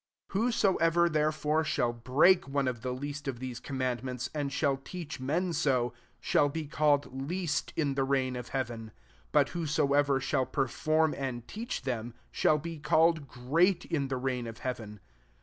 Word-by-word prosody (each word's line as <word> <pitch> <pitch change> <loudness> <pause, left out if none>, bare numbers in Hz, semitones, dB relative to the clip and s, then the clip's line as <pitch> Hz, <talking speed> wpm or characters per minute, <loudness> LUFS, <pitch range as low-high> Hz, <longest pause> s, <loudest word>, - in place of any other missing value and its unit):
19 205 +4 +2
Whosoever 175 -7 +3
therefore 155 0 +1
shall 120 -5 0
break 135 +9 +4
one 140 -1 0
of 120 -3 -2
the 130 0 -2
least 145 +3 -5
of 130 -3 -2
these 125 -1 -6
commandments, 130 -1 -3
and 145 -2 -2
shall 140 -1 +1
teach 155 +1 -7
men 165 +7 0
so, 125 -6 +1 0.3
shall 145 - +2
be 160 +2 -4
called 145 -3 +1
least 170 -3 -1
in 145 -4 +1
the 135 - 0
reig^ 135 -1 0
of 125 -1 -6
hea 135 -1 0
ven; 115 -2 -9 0.4
but - - +4
whosoever 145 -4 +2
shall 130 0 0
per 135 -2 0
form 155 +5 +1
and 125 -4 -4
teach 225 - -5
tkemy 120 -3 -3 0.2
shall 155 - +3
be 165 +1 -6
called 160 0 +3
great 165 +10 +1
in 145 -4 -1
the 130 -1 -2
reign 125 -2 -2
of 115 0 -9
hea 130 -1 -1
ven. 105 -3 -10
140 Hz, 175 wpm, -30 LUFS, 130-155 Hz, 0.4 s, break